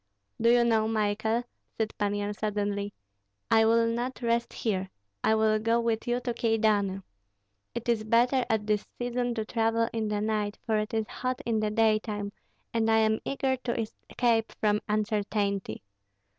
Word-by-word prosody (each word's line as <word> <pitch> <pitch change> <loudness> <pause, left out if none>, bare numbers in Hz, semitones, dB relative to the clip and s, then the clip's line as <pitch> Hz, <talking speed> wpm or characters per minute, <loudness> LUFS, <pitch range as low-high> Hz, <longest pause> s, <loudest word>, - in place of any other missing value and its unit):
"Do 230 - +5
you 240 0 +5
know, 225 -2 +3
Michael," 220 +2 0 0.3
said 220 -1 -1
Pan 205 -1 +1
Yan, 205 0 -2
suddenly, 205 -1 -2 0.6
"I 225 0 +6
will 230 +1 +4
not 240 +3 -2
rest 235 0 +1
here; 190 -4 -2 0.3
I 220 - +4
will 220 0 +3
go 230 +2 +2
with 230 -1 -1
you 240 +1 +1
to 245 -1 -2
Kyedani. 215 -4 +1 0.7
It 235 0 -4
is 230 -2 +2
better 240 +4 +3
at 220 -2 +1
this 210 -1 0
season 245 0 -1
to 220 -2 -2
travel 225 0 +1
in 225 -1 -1
the 210 0 -1
night, 210 -1 -1
for 220 -2 +2
it 215 +1 -3
is 220 -1 0
hot 255 0 -3
in 225 -2 +1
the 215 0 0
daytime, 215 -2 +1 0.4
and 225 -1 +1
I 220 - +5
am 220 0 +3
eager 265 -1 0
to 240 -2 -3
escape 225 +1 -1
from 210 -1 +2
uncertainty. 205 - -1
220 Hz, 170 wpm, -28 LUFS, 210-235 Hz, 0.7 s, I